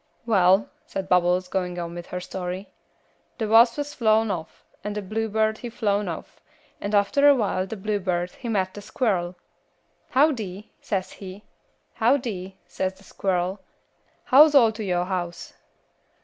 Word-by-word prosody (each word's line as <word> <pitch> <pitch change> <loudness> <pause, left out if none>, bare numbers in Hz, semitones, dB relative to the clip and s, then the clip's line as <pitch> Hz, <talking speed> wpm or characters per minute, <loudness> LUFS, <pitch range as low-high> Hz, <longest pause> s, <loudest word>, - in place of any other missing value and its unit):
"Well," 195 -2 +4 0.2
said 195 -1 -4
Bubbles, 180 0 +3
going 180 -1 -2
on 170 -1 -4
with 175 0 -8
her 180 - -4
story, 180 +1 -5 0.7
"the 220 - -2
wass 230 +2 +6
he 290 - -1
flown 225 -6 +1
off, 160 -4 -7 0.2
and 210 0 -4
the 210 - -2
bluebird 220 +1 0
he 240 - -6
flown 205 -3 0
off, 165 - -7 0.4
and 205 +1 -1
after 275 +9 +4
a 285 - +7
while 195 -5 0
the 220 - -6
bluebird 185 -3 -1
he 240 - -7
met 190 -4 0
a 205 - -7
squirl. 200 -5 -1 0.7
'Howdy?' 225 - +1
says 190 -2 -2
he. 195 +1 -10 0.5
'Howdy,' 220 -7 0
says 190 0 -3
the 195 - -20
squirl. 185 0 -1 0.6
'How's 295 +3 +7
all 235 -5 +7
to 220 0 -6
yo' 180 -3 0
house?' 175 -2 -4
200 Hz, 150 wpm, -24 LUFS, 180-225 Hz, 0.7 s, a